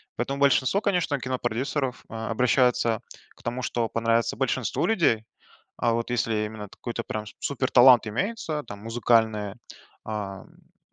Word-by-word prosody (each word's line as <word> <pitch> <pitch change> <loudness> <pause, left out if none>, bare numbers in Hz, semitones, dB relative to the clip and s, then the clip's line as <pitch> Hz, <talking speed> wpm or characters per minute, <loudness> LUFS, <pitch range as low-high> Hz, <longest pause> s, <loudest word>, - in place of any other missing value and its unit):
Поэтому 135 +3 -3
большинство, 140 +6 +3
конечно, 180 -8 0
кинопродюсеров, 130 +1 -2
э, - - -11
обращаются 115 0 +2 0.3
к - - -21
тому, 120 +2 -3
что 115 -2 -1
понравится 115 -1 +1
большинству - - 0
людей. 160 - +2 0.5
А 120 - +2
вот 115 +1 -2
если 110 -3 0
именно 105 -1 -7
какой-то 115 +3 -5
прям 110 0 -4 0.2
супер 135 -2 -1
талант 125 -2 +7
имеется, 155 - -2
там, 100 -2 -9
музыкальное, 110 -2 +1 0.5
а, 100 -3 -5
ну, - - -24
120 Hz, 135 wpm, -26 LUFS, 110-130 Hz, 0.5 s, талант